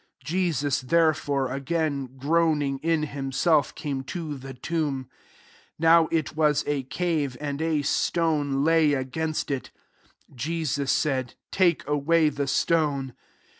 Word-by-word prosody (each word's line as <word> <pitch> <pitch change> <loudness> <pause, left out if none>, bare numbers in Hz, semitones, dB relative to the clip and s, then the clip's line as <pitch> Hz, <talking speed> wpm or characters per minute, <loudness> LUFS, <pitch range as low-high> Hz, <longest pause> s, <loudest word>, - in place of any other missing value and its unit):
38 - - -16
Jesus 165 -7 0
therefore, 145 -2 +1
again 140 -1 -2
groaning 150 -1 +1
in 165 0 +1
himself, 140 +1 +1
came 140 -3 -4
to 155 0 -5
the 135 -1 -9
tomb. 140 -2 -2 0.7
Now 165 0 +5
it 160 -2 -1
was 150 -2 +2
a 145 -2 0
cave, 145 -1 -2
and 145 0 -4
a 160 -3 0
stone 145 -3 +1
lay 160 -2 +4
against 155 +4 -2
it. 135 -2 -3 0.6
39 135 - -20
Jesus 150 -1 -1
said, 130 -5 0
*' - - -63
Take 180 -3 +2
away 150 +2 +3
the 140 -1 -3
stone." 140 -3 +1
150 Hz, 130 wpm, -25 LUFS, 135-160 Hz, 0.7 s, Now